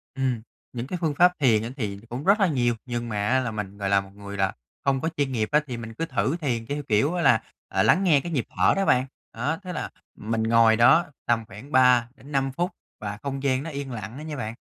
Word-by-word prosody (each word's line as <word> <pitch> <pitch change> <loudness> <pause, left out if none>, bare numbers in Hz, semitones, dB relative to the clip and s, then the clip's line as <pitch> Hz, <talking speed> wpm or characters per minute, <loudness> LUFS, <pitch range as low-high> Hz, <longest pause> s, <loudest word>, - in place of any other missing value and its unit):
Ừm, 130 -4 -1 0.3
những 120 +1 -4
cái 180 - -3
phương 155 -4 0
pháp 180 +3 +6
thiền 115 -7 +3
á 115 - -4
thì 100 -5 -3
cũng 125 +4 -5
rất 200 +4 +4
là 195 - +4
nhiều 120 -6 +1
nhưng 120 -1 -3
mà 105 -1 -1
á 130 - +3
là 120 -3 -2
mình, 105 -2 -5
gọi 100 -1 -2
là, 100 0 +4
một 95 - -13
người 100 0 -8
là 95 -1 +1 0.3
không 135 -1 +1
có 160 - 0
chuyên 140 -2 0
nghiệp 110 -3 -1
á, 150 +1 +4
thì 125 - -4
mình 115 -1 -7
cứ 165 - -3
thử 160 -1 0
thiền 120 -6 -1
theo 145 +1 -3
kiểu 110 +10 +2
á 175 - 0
là, 135 - +5 0.3
à, - - +1
lắng 190 - +4
nghe 155 -7 +5
cái 170 - -6
nhịp 130 -7 0
thở - - +5
đó 195 0 +1
bạn. 125 +1 +3 0.3
Đó, 145 +8 -1
tức 185 - -5
là 160 - -4 0.3
mình 110 +1 -2
ngồi 115 0 +5
đó 130 +9 +6 0.2
tầm 115 -2 +1
khoảng 110 +9 -12
3-5 130 +2 +2
phút 175 +8 -2 0.3
và 105 -1 -5
không 135 0 -4
gian 130 0 +1
nó 165 - -5
yên 140 -2 -5
lặng 110 +1 -6
đó - - -7
nha 155 -2 -5
bạn, 115 -4 -4
125 Hz, 260 wpm, -25 LUFS, 110-145 Hz, 0.3 s, pháp